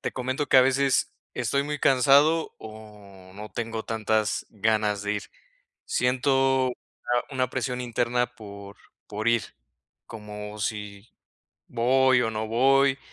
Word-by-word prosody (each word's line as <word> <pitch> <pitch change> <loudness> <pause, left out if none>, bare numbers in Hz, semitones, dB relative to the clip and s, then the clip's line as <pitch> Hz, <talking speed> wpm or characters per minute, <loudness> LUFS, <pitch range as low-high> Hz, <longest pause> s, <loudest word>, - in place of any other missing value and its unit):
te - - -4
comento 130 +3 -2
que, - - +5
a - - +9
veces, 135 +1 +2 0.2
estoy 140 0 0
muy 150 0 -4
cansado 140 +5 +4
o 105 -4 -13
no 105 +1 -9
tengo 115 -1 -4
tantas 110 -1 -1
ganas 105 -1 0
de 105 0 -1
ir. 105 - -4 0.6
Siento, 130 +1 +2
eh, 125 - -6 0.6
una 130 -2 -1
presión 125 -1 -3
interna 120 0 0
por 100 -2 -11 0.3
por 105 +2 -4
ir, 115 -1 +3 0.6
como 105 -1 -8
si, 105 0 -5 0.6
¿voy 130 +1 +3
o 115 - -1
no 110 0 -3
voy? 135 +3 +3
115 Hz, 135 wpm, -25 LUFS, 105-130 Hz, 0.6 s, a